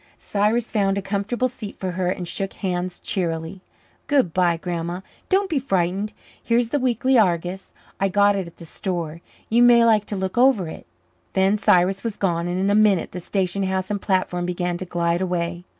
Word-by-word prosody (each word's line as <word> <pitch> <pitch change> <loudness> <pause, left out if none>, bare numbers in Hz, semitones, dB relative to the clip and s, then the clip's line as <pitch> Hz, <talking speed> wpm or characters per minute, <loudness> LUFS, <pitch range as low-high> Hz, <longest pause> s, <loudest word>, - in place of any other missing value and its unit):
Cyrus 215 +3 0
found 200 -3 +1
a - - -1
comfortable 205 +6 -1
seat 230 -5 -9
for 185 -1 -2
her 180 0 -1
and 180 -1 -3
shook 195 +2 -3
hands 180 -2 -3
cheerily. 170 0 -3 0.5
"Good 270 - +2
bye, 175 -2 +2
Grandma. 175 +1 -4 0.3
Don't 390 +1 +2
be 320 -6 0
frightened. 195 -4 -1 0.3
Here's 235 0 +1
the 290 - 0
Weekly 255 0 +2
Argus. 180 -1 -1 0.2
I 195 0 +2
got 205 +1 +4
it 190 -3 -3
at 170 - -14
the 170 - -11
store. 170 -2 -4 0.3
You 235 +2 +3
may 240 -1 +7
like 215 -2 +4
to 205 - -4
look 190 +4 -2
over 250 -9 +4
it." 160 - -9 0.5
Then 190 +1 +3
Cyrus 195 -2 +3
was 230 -3 -3
gone, 170 -3 0
and 175 +1 -2
in 195 +1 +1
a - - +3
minute 205 -4 +3
the 180 - -6
station 190 +1 -1
house 190 0 -1
and 205 -1 -2
platform 180 -2 0
began 180 0 -2
to 185 - -6
glide 170 0 0
away. 175 -1 -2
190 Hz, 195 wpm, -22 LUFS, 175-215 Hz, 0.5 s, may